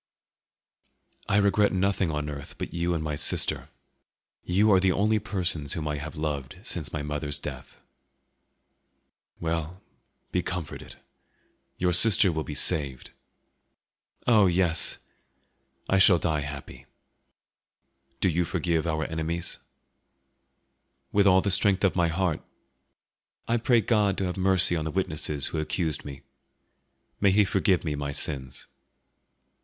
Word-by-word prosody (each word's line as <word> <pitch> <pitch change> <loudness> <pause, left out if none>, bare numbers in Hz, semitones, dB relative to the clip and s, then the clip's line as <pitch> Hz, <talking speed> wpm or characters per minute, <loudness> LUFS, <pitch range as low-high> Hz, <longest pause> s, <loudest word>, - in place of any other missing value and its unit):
"I 100 - +3
regret 100 0 +3
nothing 95 -1 +1
on 75 -1 -3
earth 70 -1 -7
but - - -6
you 85 0 -1
and 80 - -2
my 75 -1 -2
sister. 75 - +1 0.7
You 100 +4 +3
are 95 - +6
the 95 0 +2
only 105 +3 +2
persons 90 -9 -2
whom 80 -2 -4
I 75 -1 -2
have 75 +2 -7
loved 75 -1 -4
since 85 - -4
my 75 - -4
mother's 75 -1 -2
death." - - -9 1.6
"Well, 80 +3 -3 0.5
be 90 - +1
comforted. 90 -5 -6 0.8
Your 90 0 +1
sister 95 0 +5
will 80 -1 -2
be 75 - -7
saved." 70 -5 0 1.1
"Oh, 110 -5 +5
yes! 85 -2 +1 0.9
I 95 - +3
shall 95 -1 +6
die 80 -2 -1
happy." 70 0 -8 1.3
"Do - - +3
you 90 0 +1
forgive 85 -1 -1
our 80 -1 -1
enemies?" 80 +1 -3 1.5
"With 100 0 +3
all 95 0 +6
the 100 - -1
strength 95 +1 +3
of 95 - +2
my 85 -2 +2
heart. 85 -1 -1 1.1
I 115 - +2
pray 120 0 +3
God 105 -4 +1
to - - -1
have 90 - -3
mercy 95 -2 +3
on 80 - -1
the - - -2
witnesses 75 -5 -1
who 80 - -3
accused 80 -1 -2
me. 70 -1 -9 1.0
May 100 - +4
He 100 +2 +4
forgive 95 -1 +1
me 75 -3 -2
my 70 0 -3
sins!" 65 -2 -2
85 Hz, 135 wpm, -26 LUFS, 75-95 Hz, 1.6 s, are